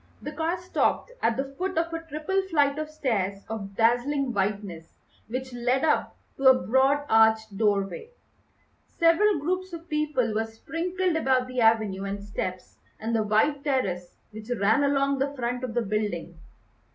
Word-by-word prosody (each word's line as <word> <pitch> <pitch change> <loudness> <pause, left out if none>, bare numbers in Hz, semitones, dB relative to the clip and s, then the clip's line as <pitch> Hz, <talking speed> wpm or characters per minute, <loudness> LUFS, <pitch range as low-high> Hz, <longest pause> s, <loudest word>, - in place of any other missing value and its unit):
The 295 - -6
car 325 +4 -1
stopped 365 +6 0
at 235 - +1
the 270 - +1 0.2
foot 375 -1 -2
of 330 0 0
a 330 - -3
triple 325 +5 -1
flight 290 -3 +2
of 310 0 -4
stairs 200 -10 -2
of 200 -3 -6
dazzling 245 +4 +2
whiteness 195 -5 -3 0.3
which 260 +2 -5
led 245 +3 0
up 315 - +1 0.2
to 270 - -4
a 260 - +9
broad 270 +5 +2
arched 220 -1 +4
doorway. 205 - 0 0.8
Several 355 +4 +3
groups 365 +4 -2
of 335 0 -8
people 300 -7 0
were 220 +1 0
sprinkled 345 +10 -2
about 260 -5 +2
the 255 -1 -2
avenue 215 -4 +2
and 200 0 -4
steps 185 -3 -5 0.2
and 225 +1 -2
the 225 - +2
wide 220 +7 +1
terrace 195 -12 -1 0.2
which 215 +2 -10
ran 220 +7 +3
along 275 -1 +1
the 280 +1 -1
front 245 0 -3
of 245 -3 -4
the 240 - +1
building. 205 -5 -3
255 Hz, 165 wpm, -26 LUFS, 215-300 Hz, 0.8 s, a